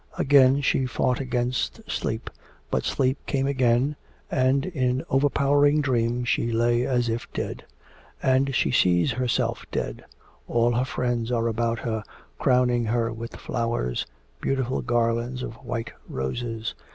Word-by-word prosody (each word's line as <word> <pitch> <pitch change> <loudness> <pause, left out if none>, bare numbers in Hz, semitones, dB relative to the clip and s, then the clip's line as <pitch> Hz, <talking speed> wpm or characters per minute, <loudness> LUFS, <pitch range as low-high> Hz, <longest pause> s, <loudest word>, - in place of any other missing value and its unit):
Again 135 0 +5
she 135 -1 +1
fought 125 0 0
against 125 -1 -1
sleep, - - -3 0.4
but - - 0
sleep 130 +1 +1
came 135 -1 0
again, 130 +1 +2 0.4
and 130 +2 +2
in 130 -8 -1
overpowering 145 +2 +3
dream 120 -3 +1
she 120 -1 +1
lay 120 +1 +2
as 125 -2 +1
if 115 +1 -3
dead. - - -4 0.5
And 130 +1 +2
she - - +2
sees 90 -1 +3
herself 125 +1 0
dead. - - -3 0.4
All 120 0 +2
her 125 +2 +1
friends 120 -2 -1
are 115 -1 +1
about 115 0 0
her 110 -3 -2 0.4
crowning 125 -2 +3
her 115 0 0
with 115 +1 -7
flowers, 115 - -2 0.3
beautiful 130 -1 0
garlands 120 +1 0
of - - -5
white 115 -1 -4 0.2
roses. 110 - -3
125 Hz, 135 wpm, -25 LUFS, 115-130 Hz, 0.5 s, Again